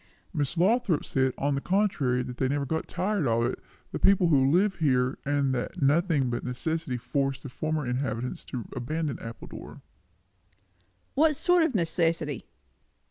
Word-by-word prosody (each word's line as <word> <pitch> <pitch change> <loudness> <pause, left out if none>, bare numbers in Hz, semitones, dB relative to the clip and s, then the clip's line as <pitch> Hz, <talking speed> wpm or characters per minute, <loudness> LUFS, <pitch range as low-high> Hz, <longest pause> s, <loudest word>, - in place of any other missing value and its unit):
"Miss 150 0 -1
Lothrop 195 -2 +2
says, 130 -1 +1
on 140 +1 0
the 140 - -1
contrary, 155 -11 +1
that 125 0 -7
they 130 - +1
never 140 +1 0
get 160 +3 -2
tired 190 -5 0
of 115 0 +2
it, 120 - -2 0.3
the - - -3
people 190 -3 +4
who 135 -3 +4
live 190 +6 +3
here; 130 -4 +1
and 140 -1 +1
that 130 +8 -3
nothing 145 -2 +2
but 120 - -3
necessity 145 +2 -2
forced 135 +3 -2
the 140 - -6
former 155 +2 -2
inhabitants 125 -1 -2
to 120 -3 -5
abandon 145 +2 -2
Appledore." 115 0 -9 1.3
"What 305 +1 +4
sort 355 +4 +3
of 320 -7 +1
necessity?" 165 - 0
145 Hz, 155 wpm, -27 LUFS, 130-170 Hz, 1.3 s, people